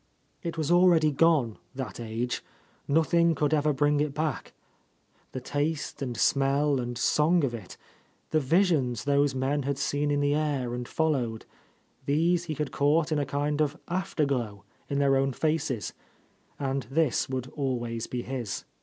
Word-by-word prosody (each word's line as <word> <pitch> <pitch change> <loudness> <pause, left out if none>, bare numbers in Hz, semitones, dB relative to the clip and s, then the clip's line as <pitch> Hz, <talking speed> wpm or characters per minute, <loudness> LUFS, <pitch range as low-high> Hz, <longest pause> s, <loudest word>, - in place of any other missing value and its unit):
It 170 -3 -4
was 155 0 -1
already 175 -3 +5
gone, 145 -7 +2 0.2
that 130 -7 -5
age; 115 +2 -3 0.4
nothing 165 +2 +3
could 150 +1 +1
ever 150 0 +3
bring 145 +1 +2
it 145 -1 -1
back. 155 -2 -2 0.8
The 130 - -4
taste 145 +3 -2
and 125 -3 -3
smell 140 0 +2
and 120 -1 -4
song 155 +7 +3
of 130 -4 0
it, 110 -6 -8 0.5
the 155 - +3
visions 150 - +2
those 140 -1 +2
men 135 +3 0
had 140 0 -2
seen 145 +1 0
in 145 0 +1
the 145 0 +2
air 145 -5 -1
and 120 0 -4
followed, 130 -9 -1 0.3
— - - -37
these 170 +4 +2
he 155 -2 -3
had 150 -1 -3
caught 150 +3 +2
in 155 - +2
a 140 - -1
kind 145 +2 -1
of 150 +1 0
after 185 -3 -1
glow 115 -7 -2 0.3
in 140 - -1
their 140 -1 +3
own 135 0 +1
faces, 155 -6 -1 0.3
— - - -38 0.3
and 135 -3 -2
this 150 -3 +1
would 130 -1 -4
always 120 -5 -2
be 125 -1 -4
his. 125 -5 -4
145 Hz, 170 wpm, -28 LUFS, 130-155 Hz, 0.8 s, already